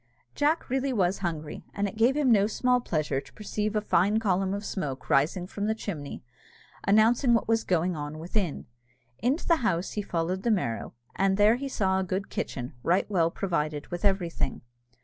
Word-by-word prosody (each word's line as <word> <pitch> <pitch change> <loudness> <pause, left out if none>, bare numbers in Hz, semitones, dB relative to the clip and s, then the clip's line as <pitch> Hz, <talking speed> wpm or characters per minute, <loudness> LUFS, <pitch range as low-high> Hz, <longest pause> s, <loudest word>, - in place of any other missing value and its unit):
Jack 300 +3 +1
really 265 +1 0
was 190 -5 +1
hungry, 160 -5 -4
and 200 0 0
it 195 - -7
gave 240 +6 +3
him 280 -4 +3
no 205 -2 +5
small 250 +3 +2
pleasure 155 - -1
to - - -18
perceive 210 0 -3
a 210 - +2
fine 205 +1 +2
column 190 -3 +1
of 200 +1 -3
smoke 135 -11 -4
rising 160 +6 +2
from 205 +2 -4
the 220 - +1
chimney, 160 -10 -6 0.6
announcing 230 +4 +4
what 230 - 0
was 225 0 +2
going 180 0 +1
on 150 0 -5
within. 175 0 -2 0.5
Into 265 +8 0
the 335 - +5
house 185 - 0
he 210 - -2
followed 180 0 -2
the 235 - 0
Merrow, 120 - -1 0.2
and 195 0 +2
there 210 +2 +6
he 275 +2 -4
saw 190 -6 +1
a - - 0
good 190 +2 -3
kitchen, 125 -1 -4
right 175 +8 +2
well 170 -4 +3
provided 155 -5 -2
with 175 0 -5
everything. 180 -8 0
195 Hz, 190 wpm, -28 LUFS, 170-220 Hz, 0.6 s, there